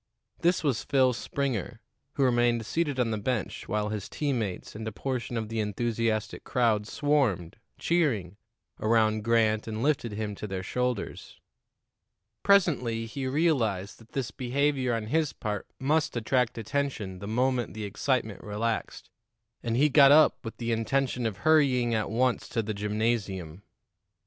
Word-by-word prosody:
This 175 +1 +2
was 135 -7 0
Phil 130 -2 +3
Springer, 120 -3 -3 0.3
who 140 - +1
remained 120 -2 +2
seated 145 +1 -1
on 120 -2 +1
the 110 - -1
bench 110 -2 -3
while 105 0 -1
his 105 -2 -4
team 140 -5 -1
mates 100 -5 -4
and 110 +1 -6
a - - -2
portion 120 0 -3
of 110 -1 -2
the 115 +1 -3
enthusiastic 110 +1 -1
crowd 115 -5 +1
swarmed, 130 - 0 0.2
cheering, 125 - 0 0.4
around 110 -1 +2
Grant 110 -1 +2
and 110 +1 -3
lifted 135 -7 +1
him 105 0 -3
to 105 - -5
their 95 -2 -4
shoulders. 125 +2 -3 1.0
Presently 130 - +3
he 130 +3 -4
realized 130 - 0
that 115 -1 -19
this 135 -4 -2
behavior 130 -1 0
on 115 -2 -3
his 155 +5 0
part 105 -3 -4
must 155 +1 +1
attract 125 +1 +1
attention 115 -5 -3
the 100 - -7
moment 125 +1 0
the 110 - -5
excitement 110 +1 -1
relaxed, 110 +2 -3 0.5
and 115 0 -1
he 145 +3 +5
got 140 -1 +7
up 155 +1 +5
with 115 - -7
the 120 -1 -2
intention 125 +1 0
of 105 -3 -5
hurrying 135 -7 +4
at 110 -2 0
once 125 +3 0
to 115 -3 -1
the 110 +1 -3
gymnasium. 105 -5 -2
115 Hz, 155 wpm, -28 LUFS, 110-135 Hz, 1.0 s, got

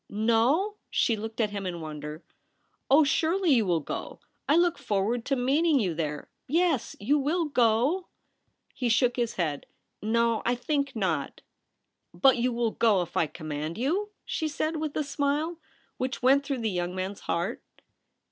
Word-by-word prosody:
' - - -54 0.2
No 295 - +2
!' - - -50
she 230 - +2
looked 220 +2 -7
at 215 -3 +1
him 200 -2 -4
in 175 -1 -4
wonder. 150 0 -7 0.3
* - - -45
Oh, 290 +4 +7
surely 335 +4 +2
you 235 -5 +4
W\\\ 170 -4 +1
go! - - -5 0.3
I 295 - +5
look 345 0 +3
forward 215 +4 -1
to 275 - +1
meet 270 +5 +2
ing 315 -5 +4
you 185 -7 0
there. 150 -2 -3 0.2
Yes; 325 -3 +1
you 280 +9 +2
will 320 +5 0
go 250 +4 +2
T 365 - -19 0.7
He 245 - -1
shook 240 +2 +3
his 235 -2 -1
head. 155 -6 -2 0.2
' - - -52
No; 230 +1 +1
I 245 - +1
think 280 +1 -1
not.' 175 -10 -2 0.4
' - - -53
But 250 +9 +5
you 245 +1 +1
wull 235 -1 0
go 210 -6 +3
if 170 - -12
I 160 - +2
command 155 +1 -5
you 350 - 0
?' - - -50
she 315 - -2
said, 310 +2 -2
with 305 -1 -3
a 305 - +1
smile 290 +4 -1 0.4
which 255 -1 -3
went 275 +2 +5
through 275 -3 -3
the 220 -2 0
young 180 0 -2
man's 190 +2 -4
heart. 175 +8 -2
240 Hz, 195 wpm, -27 LUFS, 195-290 Hz, 0.7 s, Oh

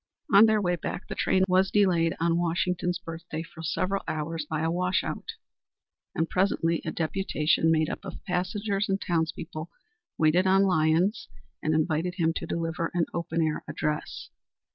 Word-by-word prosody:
On 205 +3 +9
their 215 -1 +3
way 175 -3 +1
back 175 - -5
the - - -4
train 190 0 +2
was 185 +1 +3
delayed 180 -5 +3
on 170 +1 +2
Washington's 175 +1 0
birthday 165 -2 -6
for 165 0 -12
several 185 +5 -1
hours 155 0 -3
by 155 -1 -1
a 165 +1 +1
wash 180 +2 +1
out, 450 - -5 0.8
and 165 - +1
presently 170 -3 +1
a 155 - -3
deputation 160 -2 +1
made 160 -1 +3
up - - -5
of - - -9
passengers 195 +3 -1
and 195 0 +1
townspeople 160 -2 -2 0.5
waited 165 +4 +3
on 190 +1 +5
Lyons 180 +3 +2 0.3
and 155 0 +1
invited 160 +3 0
him 165 -3 +1
to 165 - -5
deliver 165 0 -2
an 170 -2 +2
open 170 -1 -1
air 155 -1 -1
address. 150 0 -3
170 Hz, 165 wpm, -27 LUFS, 160-185 Hz, 0.8 s, On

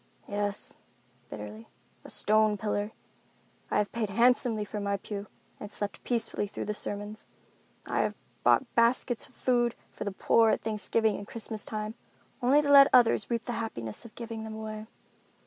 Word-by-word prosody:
"Yes," 205 0 -2 0.5
bitterly, 105 +1 -8 0.4
"a - - -11
stone 215 0 +3
pillar. 205 0 -1 0.8
I - - +1
have 210 -1 +1
paid 225 -3 -2
handsomely 230 0 +3
for 210 +1 -5
my 200 0 0
pew, 200 +1 -6 0.3
and 210 - -7
slept 205 -1 -5
peacefully 230 -3 0
through - - -5
the 210 - -2
sermons. 205 +1 -5 0.6
I - - -1
have - - -1 0.3
bought 260 - +3
baskets 235 0 +2
of 255 - -25
food 240 -2 +1 0.2
for - - -6
the 200 - -2
poor 225 +3 +4
at - - +1
Thanksgiving 220 0 0
and 200 - -8
Christmas 220 -1 -3
time, 215 0 -3 0.5
only 275 +5 +5
to 285 - +1
let 275 -1 +10
others 235 -3 +5
reap 235 -1 -1
the - - -3
happiness 115 - -5
of 230 - -13
giving 230 -2 -6
them 220 0 -6
away. 215 0 -6
215 Hz, 165 wpm, -29 LUFS, 205-235 Hz, 0.8 s, let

